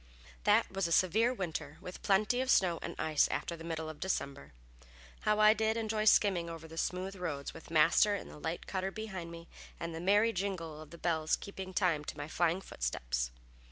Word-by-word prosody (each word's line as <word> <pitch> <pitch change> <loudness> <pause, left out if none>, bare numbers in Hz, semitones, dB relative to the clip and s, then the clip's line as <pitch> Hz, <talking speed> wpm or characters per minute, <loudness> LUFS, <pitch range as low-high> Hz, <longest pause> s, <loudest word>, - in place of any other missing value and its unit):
That - - +4
was 195 -2 0
a - - -5
severe 215 +8 +4
winter, 160 - -4
with 180 - -9
plenty 215 +5 +2
of 260 - -2
snow 175 -8 +4
and - - -5
ice 155 -2 +3
after 170 - -3
the 165 - -10
middle 160 -1 -4
of 155 -1 -8
December. 140 - -3 0.7
How 210 0 +2
I 215 0 +8
did 220 +1 0
enjoy 215 -1 -1
skimming 190 -5 +4
over 165 -1 -8
the 160 - -11
smooth 185 +3 -2
roads, 160 -7 -4
with - - -12
Master 165 +6 +5
in - - -6
the - - -11
light 160 +3 -4
cutter 190 0 -2
behind 195 -5 -6
me, 170 0 -10 0.3
and 170 0 -4
the 165 - -5
merry 205 +5 +4
jingle 175 -6 -3
of 155 - -11
the 170 - -11
bells 160 -2 +1
keeping 190 -1 -7
time 170 -4 +1
to - - -6
my 145 0 -5
flying 175 +3 +1
footsteps. - - -2
175 Hz, 200 wpm, -33 LUFS, 160-200 Hz, 0.7 s, I